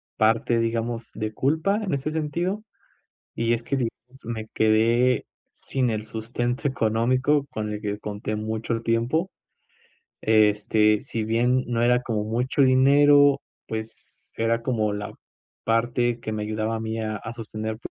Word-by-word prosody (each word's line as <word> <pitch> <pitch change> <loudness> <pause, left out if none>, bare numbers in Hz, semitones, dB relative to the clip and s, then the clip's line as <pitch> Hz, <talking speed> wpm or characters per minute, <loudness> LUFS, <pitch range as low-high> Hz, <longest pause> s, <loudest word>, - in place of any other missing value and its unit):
parte, 115 +1 +2
digamos, 115 0 -2
de 110 0 -4
culpa 160 - +1
en 190 - -2
ese 140 +2 -1
sentido, 170 +6 -2 0.7
y 115 0 +1
es 115 - -2
que, 140 - -1
digamos, 125 +1 -5
me 110 -1 -4
quedé 115 +3 +3 0.3
sin 130 -3 -1
el 110 -1 -2
sustento 120 +5 -2
económico 130 +4 +1
con 105 -1 -4
el 105 - -5
que 105 -1 -3
conté 105 +1 -4
mucho 110 +2 -3
el 115 0 -3
tiempo. 120 +11 0 0.9
Este, 105 0 +3
si 110 -2 -4
bien 120 +3 +2
no 120 -1 0
era 125 +1 +3
como 110 -4 -2
mucho 120 +6 0
dinero, 140 +2 +5 0.3
pues 110 0 -8
era 115 +1 +1
como 110 -4 0
la 105 0 -5 0.5
parte 120 +1 +1
que 110 - -4
me 105 -1 -2
ayudaba 110 +1 -2
a - - -3
mí 110 0 -3
a 110 -1 -2
a 110 +3 -7
sostener 110 -1 -5
115 Hz, 150 wpm, -25 LUFS, 110-130 Hz, 0.9 s, dinero